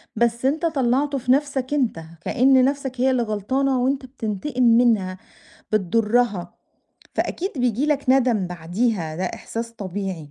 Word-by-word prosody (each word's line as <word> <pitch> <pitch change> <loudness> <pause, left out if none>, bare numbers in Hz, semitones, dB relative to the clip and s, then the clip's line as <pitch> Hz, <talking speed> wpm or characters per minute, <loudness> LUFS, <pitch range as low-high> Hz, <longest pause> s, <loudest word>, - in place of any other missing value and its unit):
بس 235 +2 +1
أنت 310 +5 +1
طلّعته 275 -1 +1
في 250 -1 0
نفسك 275 -1 0
أنت 250 - 0 0.2
كأن 260 +6 +4
نفسك 270 -2 -2
هي 265 +1 +4
اللي 250 -2 +1
غلطانة 250 +5 0
وأنت 270 +1 0
بتنتقم 250 +1 -3
منها 230 -6 +3 0.6
بتضرها 210 -1 +1 0.6
فأكيد 380 +3 -2
بييجي 250 +2 +1
لك 295 -2 0
ندم 245 -7 +3
بعديها 175 0 -2
ده 185 - -2
إحساس 230 +5 -5
طبيعي، 190 -7 -5
245 Hz, 135 wpm, -22 LUFS, 205-265 Hz, 0.6 s, كأن